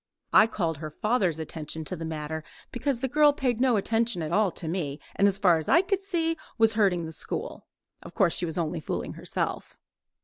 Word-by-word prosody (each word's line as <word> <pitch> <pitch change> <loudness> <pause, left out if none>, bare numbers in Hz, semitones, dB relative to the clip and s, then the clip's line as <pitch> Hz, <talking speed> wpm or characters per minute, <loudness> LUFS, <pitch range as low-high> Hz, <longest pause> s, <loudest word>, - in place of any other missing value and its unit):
I 220 - +7
called 170 -8 -2
her 155 +1 -6
father's 190 0 0
attention 160 0 -6
to 185 - -4
the 165 -1 -6
matter, 160 0 -4 0.3
because 250 0 -1
the 265 - 0
girl 295 +3 +5
paid 250 -4 -1
no 255 -4 +4
attention 225 -3 0
at 155 - -4
all 205 +2 +3
to 165 - -6
me, 155 -4 -3 0.2
and 200 - +4
as 195 -1 +2
far 180 -4 +4
as 160 - -5
I 340 - +6
could 390 0 0
see 330 -4 -1 0.2
was 225 -1 +5
hurting 190 -6 +2
the 160 - -6
school. 435 - -6 0.3
Of - - -12
course 190 -6 +3
she 175 - 0
was 160 - -4
only 170 0 -1
fooling 155 - -4
herself. - - -4
190 Hz, 210 wpm, -27 LUFS, 160-245 Hz, 0.3 s, I